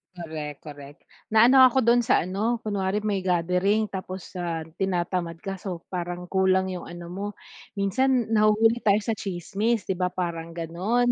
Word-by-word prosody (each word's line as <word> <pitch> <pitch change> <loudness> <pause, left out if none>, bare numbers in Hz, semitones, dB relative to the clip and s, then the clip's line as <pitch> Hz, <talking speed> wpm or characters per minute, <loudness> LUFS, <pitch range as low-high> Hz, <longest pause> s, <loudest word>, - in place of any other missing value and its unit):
Korek, 155 -4 -6
korek. 145 -1 -10 0.4
Naano 245 +4 +7
ako 260 0 +1
do'n 240 +1 +5
sa 240 -7 +2
ano, 215 +6 -1
kunwari 200 -1 -1
may 200 -2 0
gathering, 180 +4 +1
tapos, 185 -1 -6
ah, 165 -2 -2 0.2
tinatamad 175 -2 -1
ka, 195 -1 -5
so, 180 -4 -5
parang 175 0 -4
kulang 190 0 +2
'yong 180 - -7
ano 175 0 -8
mo. 200 +3 -4 0.5
Minsan, 235 +4 +1
nahuhuli 220 +2 +4
tayo 205 -1 +4
sa 225 - 0
tsismis, 200 +3 -2
'di 190 - 0
ba, 180 - +2
parang 170 -2 -4
gano'n. 200 +10 0
190 Hz, 155 wpm, -25 LUFS, 175-215 Hz, 0.5 s, Naano